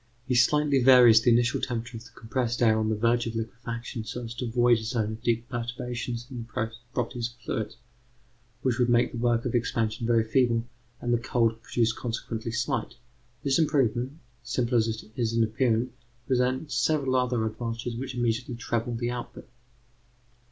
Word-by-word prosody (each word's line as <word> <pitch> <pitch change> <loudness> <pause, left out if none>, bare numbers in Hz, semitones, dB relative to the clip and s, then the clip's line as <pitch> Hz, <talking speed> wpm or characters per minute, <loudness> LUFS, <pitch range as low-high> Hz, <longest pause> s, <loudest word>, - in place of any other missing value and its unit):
He 130 - -1
slightly 140 +3 +4
varies 120 -3 +8
the 120 - +3
initial 120 +1 +3
temperature 120 0 -3
of 115 - -11
the 120 - -15
compressed 120 +1 -1
air 110 -1 +4
on 110 0 0
the 110 - +1
verge 115 +2 +2
of 115 - -4
liquefaction 115 0 -5
so 120 +3 -5
as 115 0 -6
to 120 +1 -4
avoid 120 0 +3
a - - -7
zone 110 -2 -1
of 110 +1 -7
deep 120 -1 0
perturbations 120 0 -4
in 125 - -5
the 115 0 -3 0.2
properties 120 -1 -2
of 120 - -24
fluids, 110 0 -3 0.9
which 130 -1 +1
would 125 -1 +3
make 120 0 +3
the 120 - -5
work 120 -1 +1
of 125 - -1
expansion 115 -1 0
very 115 -1 +4
feeble 115 0 +2 0.4
and 120 0 0
the 120 - +2
cold 115 -2 0
produced 115 -1 0
consequently 115 -1 -4
slight. 115 0 -2 0.5
This 135 +1 +2
improvement, 135 -3 +1 0.2
simple 120 +1 -1
as 115 -1 +4
it 110 0 -3
is 115 -2 0
in 115 0 +3
appearance, 115 +2 +1 0.3
presents 130 +3 0
several 130 +1 +1
other 125 -3 +1
advantages 115 +1 -4
which 130 +2 -5
immediately 120 +1 -1
treble 120 0 -2
the 120 +1 -2
output. 120 -1 -7
120 Hz, 180 wpm, -27 LUFS, 115-125 Hz, 0.9 s, varies